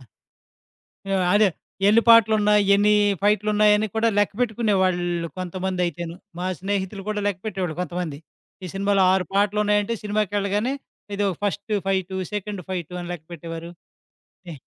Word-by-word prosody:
ఆ! - - -16 1.3
అ‌దే. 210 0 +5 0.4
ఎన్ని 220 +3 +6
పాటలున్నాయి? 210 -2 +6
ఎన్ని 205 +1 +4 0.3
ఫైట్‌లున్నాయ‌ని 210 +1 +3
కూడా 225 +1 +2
లెక్కపెట్టుకునేవాళ్ళు 190 -6 +1
కొంతమంది 185 0 -3
అయితేను. 170 0 -5 0.2
మా 180 - -3
స్నేహితులు 195 0 -3
కూడా 210 -1 -2
లెక్కపెట్టేవాళ్ళు 190 -4 -3
కొంతమంది. 175 -5 -4 0.5
ఈ - - -4
సినిమాలో 200 0 +2
ఆరు‌పాటలున్నాయంటే 205 +3 +1
సినిమాకెళ్ళగానే 205 +3 0 0.4
ఏదో 205 0 +1
ఫ‌స్ట్ 205 +1 -2
ఫైటు 190 -1 -1 0.2
సెకండ్ 205 -1 -4
ఫైటు 180 -2 -4
అని 175 - -7
లెక్కపెట్టేవారు. 165 0 -8 0.8
ఎ - - -6
200 Hz, 110 wpm, -23 LUFS, 180-210 Hz, 1.3 s, ఎన్ని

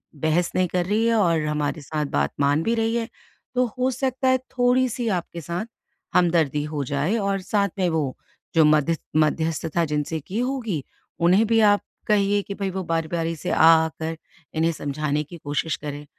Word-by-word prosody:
बहस 160 +4 +1
नहीं 185 -1 +2
कर 180 -1 0
रही 215 +4 +1
है 230 - +3
और 170 -7 +3
हमारे 150 0 -1
साथ 150 +1 -3
बात 70 0 +1
मान 145 +3 +2
भी 230 +5 +1
रही 225 0 0
है।" 230 -1 -1 0.5
तो 250 - +3
हो 260 +1 +2
सकता 260 +1 -1
है, 260 - +4
थोड़ी-सी 250 -1 0
आपके 170 0 -9
साथ 170 +6 -4 0.5
हमदर्दी 165 -5 +3
हो 145 - -1
जाए 145 - 0
और 195 -2 -1
साथ 200 -1 +3
में 180 - +2
वो, 155 -5 -1 0.4
जो 160 - +6
मध्यस 155 +2 +3 0.2
मध्यस्थता 160 +1 +1
जिनसे 150 +1 -2
की 195 +9 -4
होगी, 240 - -2 0.4
उन्हें 185 +6 +4
भी 225 0 +3
आप 205 -1 +5 0.3
कहिए 205 -1 +3
कि 200 - -6
भई, 195 -1 -2
वो 190 0 -3
बारी-बारी 165 0 -1
से 180 - -5
आ - - +4 0.2
आकर 160 0 -5 0.4
इन्हें 165 +1 +2
समझाने 150 0 -2
की 170 +3 -11
कोशिश 145 +2 -2
करें 145 0 -7
170 Hz, 180 wpm, -24 LUFS, 155-210 Hz, 0.5 s, जो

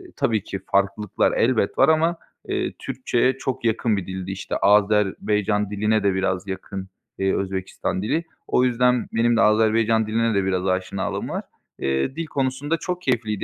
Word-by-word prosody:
tabii 110 -4 0
ki 95 - -5
farklılıklar 100 +1 +1
elbet 115 -4 +1
var - - +5
ama, 165 +2 +3 0.3
eee, - - -2
Türkçeye 130 0 0
çok 130 -3 -3
yakın 115 -1 +1
bir 95 - -4
dildi. 95 0 -5
İşte, 95 - -4
Azerbaycan 105 0 +2
diline 105 +1 +1
de 100 -1 +3
biraz 95 0 -1
yakın, 95 0 -6 0.3
eee, 95 0 +1
Özbekistan 95 -1 -3
dili. 155 +11 0 0.2
O 125 - +3
yüzden 125 0 +2
benim 115 +1 +3
de - - +4
Azerbaycan 110 +1 +3
diline 115 +1 +1
de 100 - +2
biraz 95 0 0
aşinalığım 95 +1 -2
var. - - -3 0.4
Eee, 70 - -1
dil 165 - -3
konusunda 140 +2 -1
çok 180 +1 -4
keyifliydi 115 - -1
105 Hz, 160 wpm, -23 LUFS, 95-120 Hz, 0.4 s, var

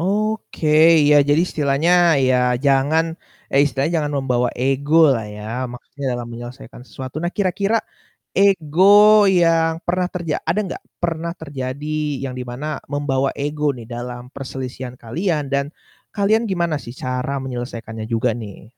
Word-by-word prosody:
Oke, 210 -2 -1 0.3
iya 150 0 +5
jadi 145 +2 +4
istilahnya 145 +2 +1 0.4
ya 130 - +3 0.3
jangan 140 +4 +3 0.5
eh, 140 - +5
istilahnya 140 +3 -1
jangan 150 -1 -2
membawa 125 -2 +1
ego 135 +3 0 0.2
lah 115 - -3
ya, 105 - -9 0.3
maksudnya 140 +3 -10
dalam 120 -1 -4
menyelesaikan 120 +1 -10
sesuatu. 130 +1 -8
Nah, 175 +1 -2
kira-kira 200 +2 +1 0.6
ego 185 -5 +3 0.6
yang 165 -1 +3
pernah 180 +1 0
terja 170 -4 -2
ada 170 - +1 0.2
gak, - - -10 0.2
pernah 170 0 -2
terjadi 140 -1 -5 0.4
yang 130 -2 -4
di 125 - -4
mana 130 +5 -6 0.3
membawa 140 -2 0
ego 150 +1 -2
nih 115 -2 -10
dalam 120 0 -6
perselisihan 130 -2 -6
kalian 155 - -1
dan 140 0 +1 0.5
kalian 210 +3 +3
gimana 170 -4 0
sih 120 - -8
cara 130 +1 -2
menyelesaikannya 115 -3 -6
juga 115 +2 +1
nih? 100 0 -11
140 Hz, 140 wpm, -20 LUFS, 125-165 Hz, 0.6 s, iya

